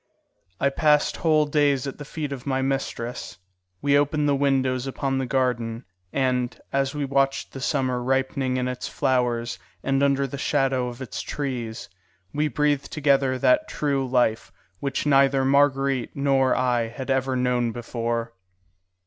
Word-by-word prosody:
I 140 - +3
passed 150 +1 +2
whole 155 -2 +3
days 145 -3 +2
at 135 - -6
the 145 - -7
feet 150 0 -5
of 135 -1 -6
my 130 -1 0
mistress. 125 -7 -3 0.5
We 140 0 +3
opened 145 +1 +1
the 145 - +3
windows 135 -2 +1
upon 135 0 -1
the 130 - -2
garden, 120 -3 -1 0.3
and, 125 -2 0
as 135 +1 0
we 145 -1 -1
watched 135 0 0
the 135 - -7
summer 130 -3 0
ripening 130 0 0
in 125 0 -1
its 125 0 -4
flowers 120 -3 0 0.2
and 135 0 +1
under 140 -1 +2
the 135 +1 -6
shadow 135 -3 +1
of 120 -1 -7
the 130 - -6
trees, 125 -3 -4 0.5
we 150 +1 +1
breathed 150 -1 0
together 140 -3 +2
that 315 - +3
true 140 -2 -1
life 120 -5 +1 0.3
which 140 0 -2
neither 135 -1 +4
Marguerite 135 -2 +2
nor 135 -2 +2
I 125 -2 +1
had 130 +4 -5
ever 130 0 +1
known 125 -2 +1
before. 115 0 -3
135 Hz, 155 wpm, -24 LUFS, 125-140 Hz, 0.5 s, neither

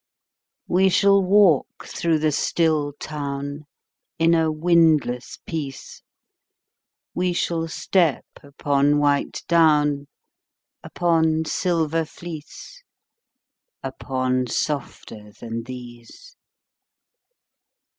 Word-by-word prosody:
We 190 +2 +3
shall 200 +1 +4
walk 190 -5 +3
through 165 -2 0
the 155 0 +1
still 155 -1 0
town 145 0 -6 0.5
In 165 0 +3
a 160 -1 +2
windless 155 -6 +2
peace; 145 -5 -6 1.1
We 180 0 0
shall 165 -1 -1
step 165 -2 0 0.2
upon 145 0 +1
white 145 -1 0
down, 150 -4 +3 0.7
Upon 160 -2 +1
silver 165 -2 0
fleece, 165 - -10 1.0
Upon 130 -1 -2
softer 115 -7 -4
than 115 0 -6
these. 125 - -11
155 Hz, 80 wpm, -22 LUFS, 140-170 Hz, 1.1 s, shall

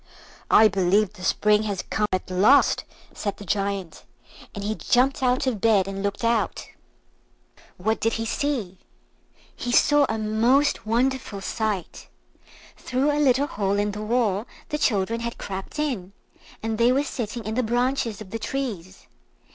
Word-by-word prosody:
"I 220 - +7
believe 195 +1 +2
the 195 - -14
Spring 210 +2 +3
has 195 -3 -3
come 210 -1 +1
at 185 0 -2
last," 210 +10 +4 0.3
said 200 -2 -4
the 205 - -10
Giant; 195 -2 -2 0.5
and 200 - -5
he 210 +1 -1
jumped 255 +5 +1
out 255 0 +2
of 235 -7 -1
bed 210 -4 +3
and 195 0 -4
looked 200 +2 -3
out. 230 -1 0 1.1
What 220 +4 0
did 225 - 0
he 225 - -2
see? 225 -8 -2 0.8
He 245 - -4
saw 290 +3 +4
a 220 - -1
most 225 +5 +2
wonderful 245 -2 0
sight. 210 -3 -3 0.7
Through 265 +4 0
a 295 +1 0
little 270 0 +3
hole 200 -6 -1
in 205 0 0
the 210 +1 -6
wall 215 -2 0 0.2
the 300 - -2
children 225 -4 +1
had 235 0 -4
crept 190 +7 -6
in, 240 -11 -2 0.5
and 225 0 -2
they 235 +1 +5
were 275 +3 +2
sitting 235 -4 -5
in 215 - -3
the 250 - +1
branches 240 -2 -1
of 195 -3 -10
the 225 - -4
trees. 215 -8 -5
220 Hz, 160 wpm, -24 LUFS, 200-250 Hz, 1.1 s, I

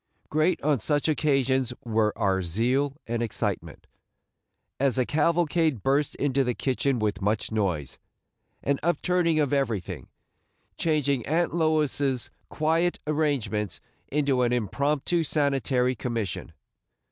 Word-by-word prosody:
Great 155 +4 +2
on 145 -3 +2
such 145 +9 +1
occasions 135 -5 +1
were 110 -2 +1
our 95 -1 +1
zeal 125 - 0
and 115 0 -2
excitement, 115 -3 -3 0.9
as 135 -2 +2
the 130 -1 +2
cavalcade 160 - +1
burst 140 +2 +1
into 140 -1 +1
the 125 -2 -1
kitchen 135 0 0
with 105 -3 -1
much 105 +3 0
noise, 90 -10 -2 0.6
and 140 -1 +1
upturning 175 0 +1
of 145 -2 +1
everything, 115 -10 -2 0.7
changing 145 -6 +1
Aunt 165 +4 +1
Lois's 150 -5 +1 0.2
quiet 165 +3 +1
arrangements 140 - -1 0.3
into 140 -3 +1
an 120 -1 +2
impromptu 140 - 0
sanitary 135 -4 +1
commission. 115 -5 -4
135 Hz, 115 wpm, -26 LUFS, 120-150 Hz, 0.9 s, Great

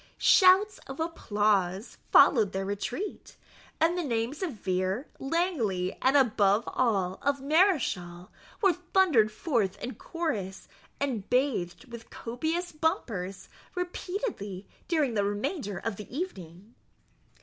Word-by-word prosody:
Shouts 385 +2 +5
of 270 +2 -8
applause 205 - 0
followed 215 - +6
their 195 0 -2
retreat; 225 - -5 0.4
and 330 +2 +3
the 355 - -1
names 240 - -2
of 365 -5 -2
Vere, 190 +4 -2
Langley, 270 - -1
and, 270 +2 +4
above 215 -4 +3
all, 195 -7 0
of 280 0 0
Mareschal, 265 - +1 0.3
were 385 -2 +5
thundered 350 - +3
forth 215 - -1
in 255 - -5
chorus, 225 - -4 0.3
and 250 -8 -2
bathed 250 -6 0
with 235 -1 -10
copious 320 +9 -3
bumpers 215 - -2 0.3
repeatedly, 360 - -4 0.2
during 305 -8 +1
the 205 -2 +1
remainder 205 - -2
of 215 0 -4
the 210 - -10
evening. 195 - -7
235 Hz, 115 wpm, -28 LUFS, 200-325 Hz, 0.4 s, followed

